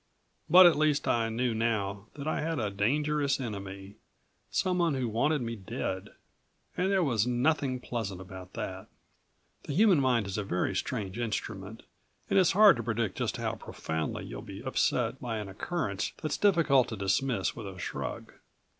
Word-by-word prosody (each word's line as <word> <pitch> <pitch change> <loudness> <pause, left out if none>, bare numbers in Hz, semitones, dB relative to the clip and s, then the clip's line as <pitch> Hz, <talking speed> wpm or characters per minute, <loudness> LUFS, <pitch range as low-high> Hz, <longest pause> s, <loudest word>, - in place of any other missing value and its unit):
But 180 +3 +9
at 165 -4 +6
least 155 -2 +2
I 115 -1 +2
knew 120 +1 0
now 105 -3 -1
that 145 0 -6
I - - 0
had 160 0 -1
a 105 -5 -1
dangerous 140 +8 +1
enemy, 100 -3 -6 0.5
someone 180 -5 +1
who 130 -2 -1
wanted 135 +6 +1
me 115 0 -3
dead. 95 -1 -4 0.7
And 185 +2 +1
there 195 -2 +3
was 120 -6 +1
nothing 130 +1 +1
pleasant 110 -7 -4
about 95 0 -10
that. 95 0 -5 0.8
The - - -4
human 200 -4 +5
mind 125 -5 +2
is 100 +2 -3
a - - -1
very 90 0 -1
strange 105 0 -3
instrument 110 -2 -4 0.5
and - - +5
it's 185 - +4
hard 205 - +7
to 115 - -3
predict 110 -3 -1
just - - -1
how - - -2
profoundly 80 0 -4
you'll - - -7
be - - -9
upset - - 0
by 115 -2 -3
an 105 -2 -5
occurrence 100 - -3
that's 155 -2 -2
difficult 165 -10 +4
to 110 - -5
dismiss 95 0 0
with - - -7
a 95 -1 -8
shrug. 90 - -5
115 Hz, 170 wpm, -30 LUFS, 100-150 Hz, 0.8 s, But